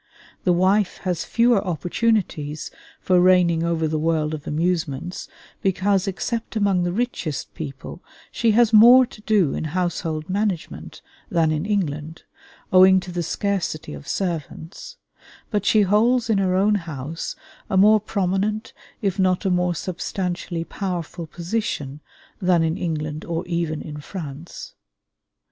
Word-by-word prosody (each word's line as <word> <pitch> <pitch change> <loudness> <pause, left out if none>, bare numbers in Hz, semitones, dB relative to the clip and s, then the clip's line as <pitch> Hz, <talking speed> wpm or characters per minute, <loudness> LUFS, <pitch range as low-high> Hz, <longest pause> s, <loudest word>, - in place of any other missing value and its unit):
The 180 - +4
wife 185 +3 +2
has 180 -3 -1
fewer 235 -3 +3
opportunities 175 - -1 0.3
for 180 -1 +3
reigning 180 -2 +4
over 165 -1 0
the 155 0 -1
world 155 -1 0
of 150 -2 -7
amusements, 165 0 -2 0.3
because 195 0 +1
except 225 +5 -3
among 200 -4 +2
the 175 0 0
richest 185 - -3
people 145 +3 -8 0.3
she 230 - +1
has 230 0 +4
more 240 +4 +8
to 215 - -15
do 205 -9 +2
in - - -3
household 165 -3 -2
management 195 -2 -3 0.3
than 165 -2 +2
in 155 +5 -2
England, 160 -6 -2 0.5
owing 190 0 +7
to 180 0 -8
the 175 0 -2
scarcity 180 - -2
of 70 -1 -10
servants; 180 - -4 0.5
but 205 -2 -1
she 215 -1 +5
holds 225 +4 +2
in 205 - +3
her 185 -1 +1
own 200 +3 +3 0.2
house 150 +3 -5 0.3
a 190 - +1
more 210 +3 +6
prominent 205 +1 -1 0.3
if 195 -1 0
not 185 +1 +2
a 190 - +2
more 180 -1 +1
substantially 180 -1 -3
powerful 175 -3 -5
position 165 -6 -3 0.4
than 180 -3 +3
in 160 0 0
England 155 -3 -3
or 170 +1 -3
even 170 -3 -2
in 150 -1 -7
France. 155 -1 -8
180 Hz, 140 wpm, -22 LUFS, 160-200 Hz, 0.5 s, more